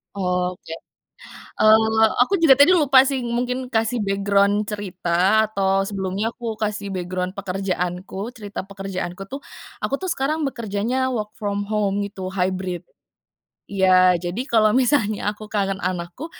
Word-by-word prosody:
Oke. 180 -3 -2 0.8
Eee, 220 0 +5
aku 255 +11 +3
juga 330 -6 +6
tadi 360 +6 +7
lupa 270 -4 +5
sih, 265 -3 -2
mungkin, 250 +2 -2
kasih 225 0 0
background 200 +1 +1
cerita, 195 +1 +1
atau 195 -2 +1
sebelumnya, 195 +1 -2
aku 230 -2 -6
kasih 205 -2 -3
background 180 0 -3
pekerjaanku. 190 0 -3
Cerita 205 -2 -6
pekerjaanku 195 -1 -6
tuh, 275 - -4 0.4
aku - - -2
tuh 370 +3 -2
sekarang 305 +1 -1
bekerjanya 240 0 -1
work 215 -4 -3
from 205 -1 -2
home 205 -1 -1
gitu, 195 -2 -6
hibrid. 185 -1 -2 0.9
Iya, 185 -2 +4
jadi 175 +7 -3
kalau 215 -2 +4
misalnya, 235 -6 +2
aku 210 +1 -10
kangen 195 -2 -1
anakku, 180 - -4
205 Hz, 130 wpm, -22 LUFS, 190-230 Hz, 0.9 s, tadi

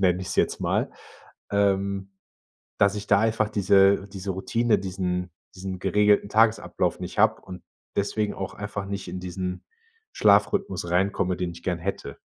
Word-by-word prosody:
nenne 90 -1 +2
ich 95 - -6
es - - -4
jetzt - - +1
mal, - - 0 0.6
ähm, 100 -1 0 0.7
dass 100 0 +4
ich 105 0 -6
da 100 - +5
einfach 110 0 +1
diese 100 -1 +4
diese 95 0 -5
Routine, 115 +3 +1
diesen 90 -2 -3 0.2
diesen 95 -1 -6
geregelten 105 +1 +3
Tagesablauf 110 +1 +2
nicht - - -5
habe - - +4
und 90 -2 -10 0.4
deswegen 105 +1 0
auch 95 - -5
einfach 100 -1 -5
nicht 100 -1 -5
in 95 - -5
diesen 90 0 -5 0.5
Schlafrhythmus 100 -3 +2
reinkomme, 90 0 +1
den 90 -1 -2
ich 85 0 -13
gern 90 -2 -1
hätte. 80 -6 -5
100 Hz, 155 wpm, -25 LUFS, 90-100 Hz, 0.7 s, da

